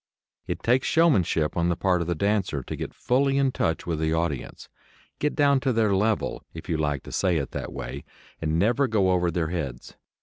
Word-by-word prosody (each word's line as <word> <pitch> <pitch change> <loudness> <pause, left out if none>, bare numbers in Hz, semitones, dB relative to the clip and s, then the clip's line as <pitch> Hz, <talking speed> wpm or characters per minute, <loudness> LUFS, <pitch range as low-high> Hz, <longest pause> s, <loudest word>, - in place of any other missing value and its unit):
It - - -4
takes 125 +3 +2
showmanship 100 - +2
on 85 0 +1
the 85 - +1
part 90 -1 +1
of 85 - -3
the 85 - 0
dancer 100 -6 0
to - - -5
get - - -5
fully 135 +2 +1
in 135 -1 +2
touch 80 -9 -1
with 80 -3 -2
the 80 0 +1
audience, 80 -5 -3 0.5
get 150 - 0
down 140 -2 +4
to 130 0 0
their 110 -4 +2
level, 105 +2 0
if - - -8
you 80 - 0
like 75 -3 -1
to - - -10
say 90 -3 +1
it 70 - -3
that - - -5
way, 65 +3 -6 0.4
and 80 0 0
never 120 +9 +2
go 100 -5 +2
over 90 -1 +2
their 80 -1 -1
heads. 70 -8 -5
90 Hz, 210 wpm, -25 LUFS, 80-120 Hz, 0.5 s, down